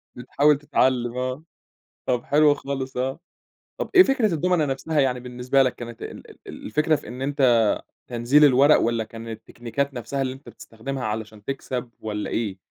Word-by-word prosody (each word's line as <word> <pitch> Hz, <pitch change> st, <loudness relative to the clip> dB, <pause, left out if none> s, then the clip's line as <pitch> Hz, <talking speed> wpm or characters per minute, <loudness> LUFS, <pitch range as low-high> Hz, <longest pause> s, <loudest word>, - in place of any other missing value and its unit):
بتحاول 140 Hz, +4 st, +2 dB
تتعلم 130 Hz, -4 st, +1 dB
آه، 130 Hz, +3 st, -3 dB, 0.6 s
طَب 125 Hz, -1 st, 0 dB
حلو 150 Hz, 0 st, +4 dB
خالص 135 Hz, -2 st, -5 dB
آه. 130 Hz, +4 st, -2 dB, 0.6 s
طَب -, -, -3 dB
إيه 370 Hz, -, +10 dB
فكرة 255 Hz, -, +1 dB
الدُومنة 175 Hz, 0 st, +1 dB
نَفْسها، 145 Hz, +3 st, -1 dB
يعني 130 Hz, -2 st, +2 dB
بالنسبة 125 Hz, +2 st, +1 dB
لك 130 Hz, -, -1 dB
كانت 120 Hz, -1 st, -9 dB
ال -, -, -9 dB, 0.2 s
ال -, -, -9 dB
الفكرة 155 Hz, +7 st, +2 dB
في -, -, -7 dB
إن 125 Hz, +3 st, -8 dB
أنت 140 Hz, +1 st, -2 dB, 0.7 s
تنزيل 125 Hz, +5 st, +4 dB
الورق 140 Hz, +2 st, +6 dB
والّا 115 Hz, -1 st, 0 dB
كان 115 Hz, +1 st, -10 dB
التكنيكات 120 Hz, +4 st, -4 dB
نَفْسها 135 Hz, +2 st, -4 dB
اللي 130 Hz, -1 st, -1 dB
أنت 130 Hz, -2 st, -13 dB
بتستخدمها 120 Hz, +4 st, -7 dB
علشان 110 Hz, -1 st, -5 dB
تكسَب، 130 Hz, -3 st, -4 dB
والّا 105 Hz, -1 st, -4 dB
إيه؟ 105 Hz, -4 st, -2 dB
130 Hz, 165 wpm, -24 LUFS, 120-145 Hz, 0.7 s, إيه